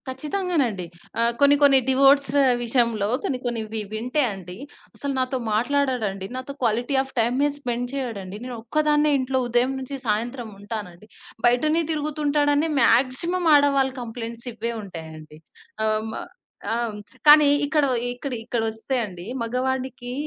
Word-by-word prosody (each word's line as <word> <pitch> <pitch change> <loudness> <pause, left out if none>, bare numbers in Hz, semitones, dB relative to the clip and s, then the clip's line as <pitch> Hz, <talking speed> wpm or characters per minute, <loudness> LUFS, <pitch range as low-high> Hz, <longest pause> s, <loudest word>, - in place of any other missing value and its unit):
ఖచ్చితంగానండి. 275 - -1 0.4
ఆహ్, 235 0 +2
కొన్ని 285 0 +6
కొన్ని 275 -2 +7
డివోర్స్ 275 +1 +5 0.3
విషయంలో 235 -4 +1 0.2
కొన్ని 270 -10 -1
కొన్నివి 225 -2 -3
వింటే 250 +7 0
అండి, 180 -1 -9 0.4
అసలు 280 -1 -3
నాతో 255 +1 -1 0.2
మాట్లాడడండి. 235 -5 0
నాతో 255 +2 -6
క్వాలిటీ 240 +4 0
ఆఫ్ 270 - -15
టైమే 250 +6 +2
స్పెండ్ 245 -2 -2
చేయడండి. 210 -8 -4
నేనొక్కదాన్నే 295 +5 +1
ఇంట్లో 260 0 0
ఉదయం 245 +2 +2
నుంచి 265 +1 -6
సాయంత్రం 230 +3 -2
ఉంటానండి. 205 -2 -7 0.4
బయటనే 305 +7 +2
తిరుగుతుంటాడని 295 0 +1
మాక్సిమం 275 +9 +3
ఆడవాళ్ళ 280 -2 +4
కంప్లెయింట్స్ 235 0 -7
ఇవ్వే 230 +1 -3
ఉంటాయండి. 160 -4 -10 0.5
ఆహ్, 215 0 +1
హ్మ్. - - -6 0.6
ఆహ్, 230 -2 -2 0.3
కానీ 300 0 +9 0.2
ఇక్కడ 300 0 +2 0.2
ఇక్కడ 250 +2 -5
ఇక్కడొస్తే 225 +2 -2
అండి, 180 -4 -9 0.2
మగవాడికి 255 +1 -2
245 Hz, 120 wpm, -24 LUFS, 225-280 Hz, 0.6 s, కానీ